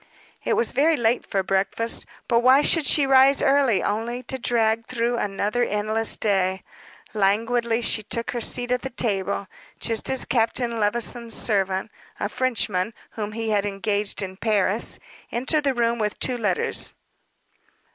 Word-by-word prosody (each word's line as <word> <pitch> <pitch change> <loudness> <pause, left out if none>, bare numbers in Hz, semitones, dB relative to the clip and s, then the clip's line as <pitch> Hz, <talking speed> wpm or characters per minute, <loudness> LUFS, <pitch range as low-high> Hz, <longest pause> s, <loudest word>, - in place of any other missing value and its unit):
It - - 0
was 230 - +2
very 305 +4 +2
late 235 +1 0
for 195 -1 -1
breakfast, 195 +4 -1 0.2
but 235 -1 +3
why 260 +4 +5
should 320 -5 +2
she 290 +1 +4
rise 270 +1 +5
early 270 -8 +3
only 235 +4 -3
to 265 - -5
drag 230 -2 +1
through 240 -1 -1
another 205 +3 -1
endless 215 0 0
day? 190 -2 0 0.5
Languidly 225 +3 +1
she 225 - +2
took 230 +2 -4
her 240 - -4
seat 245 +2 0
at 250 0 +1
the 265 - -5
table, 200 -5 -1 0.3
just 225 -2 0
as 265 - +3
Captain 235 0 0
Levison's 230 +2 +1
servant, 195 -1 +1 0.3
a 205 - -2
Frenchman 220 -5 -1 0.2
whom 215 -1 -5
he 225 0 -3
had 205 -2 +1
engaged 205 0 -2
in 190 0 -7
Paris, 210 0 +1 0.3
entered 285 +5 0
the 270 -2 +1
room 235 0 0
with 210 -1 -2
two 255 - 0
letters. 205 -5 -1
230 Hz, 155 wpm, -23 LUFS, 205-245 Hz, 0.5 s, why